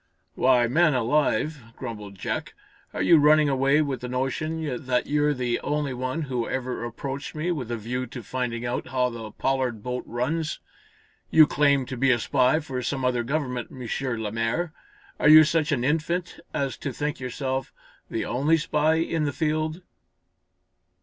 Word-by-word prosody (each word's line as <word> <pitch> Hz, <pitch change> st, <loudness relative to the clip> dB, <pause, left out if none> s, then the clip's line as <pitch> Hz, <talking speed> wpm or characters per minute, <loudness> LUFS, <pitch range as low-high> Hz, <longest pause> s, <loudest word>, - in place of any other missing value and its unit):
"Why 125 Hz, -2 st, +4 dB
man 155 Hz, +4 st, +3 dB
alive," 145 Hz, +3 st, +1 dB, 0.2 s
grumbled 105 Hz, -5 st, -7 dB
Jack, -, -, -4 dB, 0.4 s
"are -, -, -2 dB
you 165 Hz, -2 st, +6 dB
running 150 Hz, 0 st, +5 dB
away 135 Hz, +3 st, +3 dB
with 140 Hz, -3 st, -3 dB
the 125 Hz, -, -4 dB
notion 135 Hz, +2 st, -3 dB
that 125 Hz, -1 st, +1 dB
you're 150 Hz, 0 st, +1 dB
the 125 Hz, -2 st, -1 dB
only 145 Hz, -2 st, -1 dB
one 130 Hz, +5 st, -2 dB
who 125 Hz, -4 st, -2 dB
ever 125 Hz, -2 st, -3 dB
approached 135 Hz, +5 st, -5 dB
me 160 Hz, +4 st, -1 dB
with 135 Hz, -9 st, -3 dB
a 120 Hz, -, -2 dB
view 125 Hz, +4 st, -3 dB
to 120 Hz, -, -8 dB
finding 120 Hz, 0 st, -3 dB
out 120 Hz, +1 st, -2 dB
how 125 Hz, -1 st, +1 dB
the 115 Hz, -2 st, -7 dB
Pollard 125 Hz, -2 st, -1 dB
boat 125 Hz, 0 st, -3 dB
runs? 155 Hz, +7 st, -2 dB, 0.7 s
You 160 Hz, -1 st, +8 dB
claim, 140 Hz, -2 st, +2 dB
to 130 Hz, 0 st, -6 dB
be 135 Hz, +2 st, +3 dB
a 120 Hz, -, +5 dB
spy 130 Hz, +4 st, +2 dB
for 135 Hz, -5 st, -4 dB
some 130 Hz, +1 st, -2 dB
other 125 Hz, -1 st, +1 dB
government, 125 Hz, -2 st, -2 dB
M. 125 Hz, -2 st, -8 dB, 0.3 s
Lemaire. 115 Hz, +10 st, -1 dB, 0.5 s
Are 150 Hz, -, +5 dB
you 155 Hz, +1 st, +10 dB
such 155 Hz, 0 st, +1 dB
an 125 Hz, -4 st, +1 dB
infant 165 Hz, +5 st, -1 dB
as 140 Hz, -2 st, -2 dB
to 140 Hz, -, -4 dB
think 150 Hz, +3 st, -3 dB
yourself 130 Hz, +1 st, -3 dB, 0.4 s
the -, -, -2 dB
only 145 Hz, +7 st, +2 dB
spy 155 Hz, 0 st, +1 dB
in 165 Hz, -1 st, 0 dB
the 145 Hz, -, 0 dB
field?" 155 Hz, +3 st, -1 dB
135 Hz, 170 wpm, -25 LUFS, 125-150 Hz, 0.7 s, you